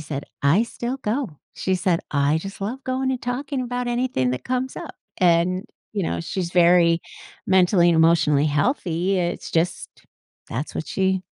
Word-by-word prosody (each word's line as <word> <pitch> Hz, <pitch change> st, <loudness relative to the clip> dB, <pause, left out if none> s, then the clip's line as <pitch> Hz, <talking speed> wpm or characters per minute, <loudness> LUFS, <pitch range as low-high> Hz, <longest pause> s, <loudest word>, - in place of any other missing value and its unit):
said, 145 Hz, -2 st, -5 dB, 0.2 s
“I 160 Hz, +11 st, +4 dB
still 240 Hz, +2 st, -4 dB
go.” 220 Hz, -, -3 dB, 0.2 s
She 190 Hz, -, -1 dB
said, 175 Hz, -1 st, +1 dB
“I 145 Hz, +2 st, +2 dB
just 195 Hz, +4 st, -8 dB
love 240 Hz, +7 st, -4 dB
going 260 Hz, 0 st, -1 dB
and 255 Hz, -, -2 dB
talking 265 Hz, +2 st, -3 dB
about 245 Hz, 0 st, -3 dB
anything 240 Hz, -, 0 dB
that 125 Hz, -, -4 dB
comes 255 Hz, +1 st, -2 dB
up," -, -, -7 dB, 0.2 s
and, 180 Hz, +1 st, +3 dB, 0.3 s
you 205 Hz, -, -1 dB
know, 85 Hz, -, -2 dB
she's 175 Hz, -, -3 dB
very 170 Hz, -1 st, +5 dB, 0.5 s
mentally 180 Hz, -1 st, +4 dB
and 170 Hz, -, +3 dB
emotionally 160 Hz, -3 st, +4 dB
healthy, 180 Hz, -, 0 dB
it's 175 Hz, 0 st, -2 dB
just 170 Hz, +1 st, 0 dB, 0.6 s
that's 130 Hz, +7 st, -4 dB
what 155 Hz, -, -4 dB
she 190 Hz, -1 st, 0 dB
180 Hz, 165 wpm, -23 LUFS, 165-240 Hz, 0.6 s, very